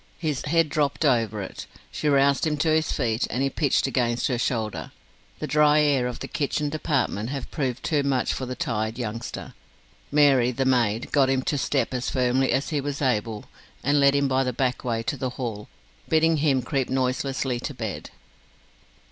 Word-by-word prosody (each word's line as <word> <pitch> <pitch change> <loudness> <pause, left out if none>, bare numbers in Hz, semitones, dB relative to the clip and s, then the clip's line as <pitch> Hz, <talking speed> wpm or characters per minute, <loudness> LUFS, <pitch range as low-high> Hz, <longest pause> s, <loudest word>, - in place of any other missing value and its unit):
His 150 -5 -2
head 165 +1 +2
dropped 150 0 0
over 115 -6 +1
it. - - -8 0.2
She 150 - -1
roused 140 +1 +3
him 150 -1 0
to 160 +3 +1
his 155 -1 +1
feet, 115 0 0
and 130 - -1
he 135 - 0
pitched 145 -2 +1
against 120 -3 0
her 125 -2 -1
shoulder. 110 - -2 0.5
The - - -4
dry 150 0 +4
air 135 -4 +2
of 125 - -6
the - - -4
kitchen 145 0 -1
department 140 -8 -1
had 135 -1 -5
proved 130 -4 -2
too 150 -4 +1
much 135 -2 0
for 130 - -4
the 130 - -4
tired 115 -7 -2
youngster. 115 -1 -5 0.6
Mary, 140 -4 +5
the 130 +2 -1
maid, 120 -4 +1
got 135 -3 +4
him 135 -1 +1
to 145 - -1
step 135 0 0
as 125 -1 -2
firmly 130 0 +1
as 135 - 0
he 150 -3 -1
was 140 0 -4
able, 110 -5 -1 0.4
and 145 +1 +3
led 140 0 +5
him 140 0 +2
by 135 0 +2
the 125 - -1
back 125 +1 -1
way 115 -2 -1
to 145 +5 -2
the 130 - -2
hall, 110 -5 -5 0.4
bidding 160 0 +3
him 140 -4 +2
creep 135 -4 -1
noiselessly 130 0 -1
to 145 - -5
bed. 110 -5 -5
135 Hz, 190 wpm, -25 LUFS, 120-145 Hz, 0.6 s, Mary